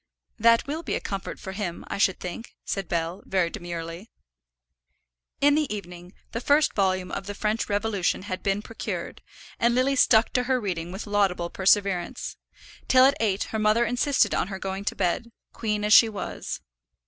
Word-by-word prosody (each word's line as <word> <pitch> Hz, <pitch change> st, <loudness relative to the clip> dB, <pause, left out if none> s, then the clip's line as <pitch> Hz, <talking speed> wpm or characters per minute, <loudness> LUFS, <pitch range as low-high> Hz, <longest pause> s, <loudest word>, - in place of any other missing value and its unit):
"That 230 Hz, +1 st, +5 dB
will 305 Hz, +4 st, -3 dB
be -, -, -2 dB
a -, -, -1 dB
comfort 195 Hz, -1 st, -5 dB
for 190 Hz, -, -7 dB
him, 190 Hz, -3 st, -4 dB
I -, -, -4 dB
should 190 Hz, -2 st, +2 dB
think," 190 Hz, +6 st, -7 dB
said 195 Hz, -3 st, -3 dB
Bell, 170 Hz, +2 st, -2 dB
very 180 Hz, -3 st, 0 dB
demurely. 170 Hz, +3 st, -6 dB, 1.3 s
In 290 Hz, +1 st, +5 dB
the 300 Hz, -4 st, +1 dB
evening 180 Hz, -3 st, -7 dB, 0.2 s
the 230 Hz, -, -3 dB
first 290 Hz, +4 st, +3 dB
volume 185 Hz, -2 st, 0 dB
of 195 Hz, -, -5 dB
the 205 Hz, -, -5 dB
French 215 Hz, +3 st, -1 dB
Revolution 205 Hz, -3 st, 0 dB
had 185 Hz, -2 st, -4 dB
been 200 Hz, +1 st, 0 dB
procured, 225 Hz, -, -5 dB, 0.4 s
and 235 Hz, +1 st, +3 dB
Lily 265 Hz, +2 st, +2 dB
stuck 225 Hz, -3 st, +4 dB
to 250 Hz, -1 st, +1 dB
her 260 Hz, 0 st, +1 dB
reading 175 Hz, -5 st, -3 dB
with 190 Hz, +3 st, -6 dB
laudable 195 Hz, -4 st, 0 dB
perseverance; 195 Hz, -2 st, +1 dB, 0.5 s
till 255 Hz, 0 st, +7 dB
at 275 Hz, -, +5 dB
eight 205 Hz, -3 st, +1 dB
her 220 Hz, -, 0 dB
mother 215 Hz, +2 st, +3 dB
insisted 250 Hz, +4 st, +2 dB
on -, -, 0 dB
her 195 Hz, -1 st, -5 dB
going 195 Hz, +1 st, -4 dB
to -, -, -1 dB
bed, 195 Hz, +6 st, -1 dB, 0.2 s
queen 210 Hz, -2 st, -2 dB
as 210 Hz, -, +4 dB
she 225 Hz, -, +8 dB
was. 205 Hz, -3 st, -5 dB
205 Hz, 180 wpm, -26 LUFS, 185-230 Hz, 1.3 s, she